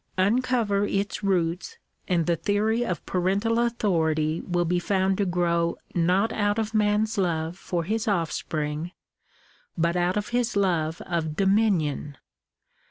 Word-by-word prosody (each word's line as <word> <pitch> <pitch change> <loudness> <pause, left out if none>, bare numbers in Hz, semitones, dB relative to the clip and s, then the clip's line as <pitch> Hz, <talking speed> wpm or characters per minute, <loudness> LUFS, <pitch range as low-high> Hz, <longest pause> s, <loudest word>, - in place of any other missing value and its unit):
Uncover 215 0 +2
its 200 +1 -2
roots, 180 - 0 0.3
and 175 -4 +1
the 170 - +2
theory 215 +6 +1
of 180 -7 -3
parental 200 +6 +1
au 235 0 +3
thority 160 -8 0
will 175 -1 0
be 175 +1 +1
found 190 +1 +1
to 200 - +1
grow 170 -1 +1 0.2
not 180 +6 +2
out 205 0 +1
of 220 -1 -2
man's 210 0 +1
love 165 -2 -1
for 175 -2 -3
his 220 +6 -2
offspring 160 -3 -2 0.8
but 170 +1 +1
out 180 +2 +1
of 210 0 -2
his 240 -1 0
love 170 -5 0
of 160 -3 -2
dominion. 190 -8 +1
185 Hz, 140 wpm, -25 LUFS, 170-210 Hz, 0.8 s, au